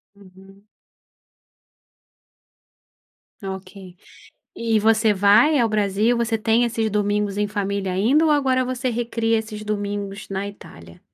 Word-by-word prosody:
Uhum. 195 +1 -19 2.8
Ok. 190 -1 -8 0.6
E 225 -2 0
você 220 0 +3
vai 215 +10 +4
ao 230 -2 +2
Brasil, 215 +3 +1
você 230 -1 0
tem 225 +2 +2
esses 225 -2 -1
domingos 205 -1 -1
em 210 - +1
família 200 -2 -3
ainda 250 - +2
ou 310 - +2
agora 260 -3 +2
você 255 0 -2
recria 230 -1 -1
esses 215 -1 -7
domingos 205 -1 -4
na 195 0 -3
Itália? 85 - -13
210 Hz, 120 wpm, -22 LUFS, 200-230 Hz, 2.8 s, vai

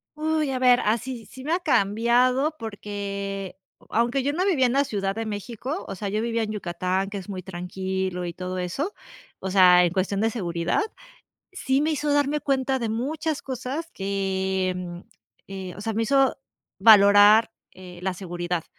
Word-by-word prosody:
Uy, 310 -1 0
a 260 - -1
ver, 250 -1 +5
ah, 215 +3 +2
sí 245 -2 -7
sí 260 - -11
me 310 +4 -1
ha 355 - +2
cambiado 250 - +2
porque, 200 -2 -5
eh, 190 - -16 0.3
aunque 240 +4 +1
yo 285 +1 0
no 365 +4 0
vivía 310 -10 +3
en 245 - +1
la 280 +1 +3
Ciudad 195 -6 -2
de 225 0 -3
México, 235 - -5
o - - -5
sea, 200 +1 -4
yo 215 +2 -1
vivía 230 0 -1
en 215 - -3
Yucatán, 185 -1 -2
que 205 - -5
es 190 - -11
muy 185 -2 -5
tranquilo 185 0 -4
y 170 - -5
todo 185 +1 -5
eso, 225 - -3 0.5
o 190 - -4
sea, 180 -2 +7
en 170 - -1
cuestión 195 +1 0
de 225 - +2
seguridad, 175 - -1 0.7
sí 275 -7 0
me 310 - +1
hizo 295 -1 -1
darme 290 +1 +1
cuenta 270 -1 0
de 235 -3 -2
muchas 285 +7 -2
cosas 265 +5 -5
que, 190 -1 -1
mm, 175 -1 -6 0.5
eh, 190 -2 -7
o - - -9
sea, 225 - -2
me 225 +1 0
hizo 270 +3 +3 0.4
valorar, 205 +1 +7 0.2
eh, 180 -1 -12
la 190 0 -1
seguridad. 175 -2 -4
210 Hz, 185 wpm, -25 LUFS, 190-260 Hz, 0.7 s, sea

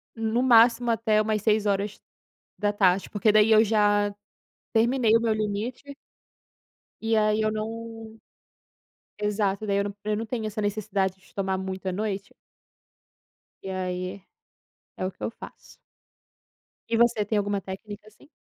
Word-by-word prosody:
no 225 +1 0
máximo 240 0 +5
até 220 -1 +2
umas 215 -1 0
6h, 205 -2 -1
porque 210 0 +2
daí 215 +1 +5
eu 220 0 +7
já 205 -1 +2 0.6
terminei 230 0 +3
o - - -4
meu 225 -1 +2
limite 215 +7 -4 1.1
e 225 0 +1
aí 215 0 +2
eu 215 - +1
não, 225 +1 -6 1.0
exato 210 -1 0
daí 200 -1 +1
eu 200 - +1
não 205 0 -5
eu 215 0 0
não 225 +1 -3
tenho 220 -1 -3
essa 215 0 -4
necessidade 205 -2 -1
de - - -23
tomar 190 -1 -1
muito 190 0 -5
à - - -1
noite. 200 0 -4 1.3
E 190 - -6
aí, 185 0 -4 0.8
é 185 - -2
o - - -2
que - - -17
eu - - -1
faço. - - -13 1.1
E 230 - +1
você 235 -2 +3
tem 210 +1 0
alguma 205 -1 -1
técnica 205 +3 -9
assim? 215 +7 -21
215 Hz, 145 wpm, -26 LUFS, 200-225 Hz, 1.3 s, eu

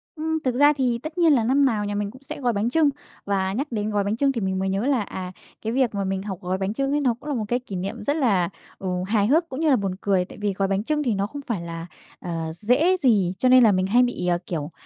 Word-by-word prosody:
Ừm, 320 0 -1
thực 255 -2 0
ra 290 +3 +6
thì 250 -4 0
tất 310 +2 -7
nhiên 335 -3 +5
là 245 -5 +3
năm 270 +5 +3
nào 215 -5 +1
nhà 205 0 -3
mình 205 0 -2
cũng 260 +3 -15
sẽ 275 - -8
gói 245 -2 +1
bánh 210 +3 0
chưng. 310 +2 +3 0.4
Và 190 -1 0
nhắc 275 +8 -2
đến 210 -2 -2
gói 205 -1 0
bánh 200 +2 -1
chưng 275 +2 +2
thì 235 -4 -3
mình 190 -1 -1
mới 190 0 -1
nhớ 195 +4 -1
là, 270 -4 +2
à, 185 -2 -6 0.3
cái 225 +1 -3
việc 250 -4 +1
mà 200 - -1
mình 190 0 -2
học 195 -3 -5
gói 185 +1 -2
bánh 190 +1 -2
chưng 275 +3 -1
ấy 295 +1 +1
nó 255 -4 +2
cũng 300 - -8
là 290 - -1
một 220 -3 -2
cái 245 +3 0
kỷ 225 -6 -8
niệm 185 +2 -4
rất 285 - 0
là, 205 - +2 0.3
ừ, 190 - -5 0.2
hài 205 -1 +2
hước 325 +6 +2
cũng 260 - -5
như 320 -1 +2
là 275 - +6
buồn 195 -5 -2
cười. 190 -3 +1
Tại - - -13
vì 205 -1 0
gói 195 +1 0
bánh 195 +1 0
chưng 300 +4 0
thì 240 -5 +1
nó 200 +1 -1
không 285 +6 -8
phải 230 -9 -3
là, 165 -1 -6 0.3
ờ, 165 -2 -4
dễ 255 - +2
gì, 205 - +3
cho 255 - +3
nên 255 0 +7
là 220 - +6
mình 185 -1 +1
hay 240 +5 +4
bị, 245 -7 -2
à, 175 -1 +2
kiểu, 160 -3 -4
220 Hz, 305 wpm, -24 LUFS, 195-270 Hz, 0.4 s, nên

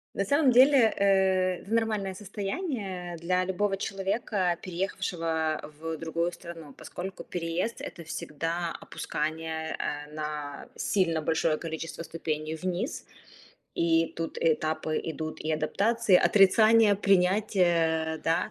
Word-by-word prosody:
На 195 - 0
самом 285 +4 +4
деле, 255 -2 +6
э, 190 -2 +2
в 200 - -11
нормальное 215 -4 0
состояние 200 - -4
для 180 +2 0
любого 195 +1 0
человека, 195 -2 -1
переехавшего 165 -4 -2 0.2
в 165 0 -4
другую 165 +2 -1
страну, 165 -4 -10
поскольку 185 +7 -7
переезд- 175 +6 -3
это 170 - -7
всегда 165 +1 -3
опускание, 160 +1 -3
э, 150 0 -4
на 150 -2 -5
сильно 170 -6 +1
большое 160 0 +1
количество 165 0 -5
ступеней 155 -1 -3
вниз. 185 - -3 0.7
И 165 0 +2
тут 165 0 -4
этапы 155 0 0
идут 155 0 -5
и 155 - -2
адаптации, 200 +7 +2
отрицание, 215 +3 +5
принятие, 180 -5 +2
да. 165 +6 +1
175 Hz, 115 wpm, -28 LUFS, 160-195 Hz, 0.7 s, деле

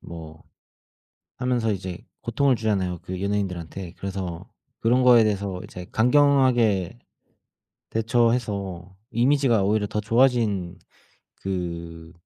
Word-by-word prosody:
뭐 80 -2 -10 1.0
하면서 125 -3 0
이제 95 -3 -4 0.2
고통을 130 +3 +2
주잖아요, 95 -6 -1
그 95 +1 -6
연예인들한테. 95 -3 -3
그래서 95 0 -5 0.3
그런 125 +3 +3
거에 120 -3 +7
대해서 100 -3 -1
이제 90 0 -9
강경하게 120 - +3 0.9
대처해서 110 -6 0 0.2
이미지가 125 -3 +3
오히려 105 +1 +1
더 105 - -3
좋아진 110 -6 +1 0.6
그 85 -3 -5
100 Hz, 255 characters per minute, -24 LUFS, 90-120 Hz, 1.0 s, 거에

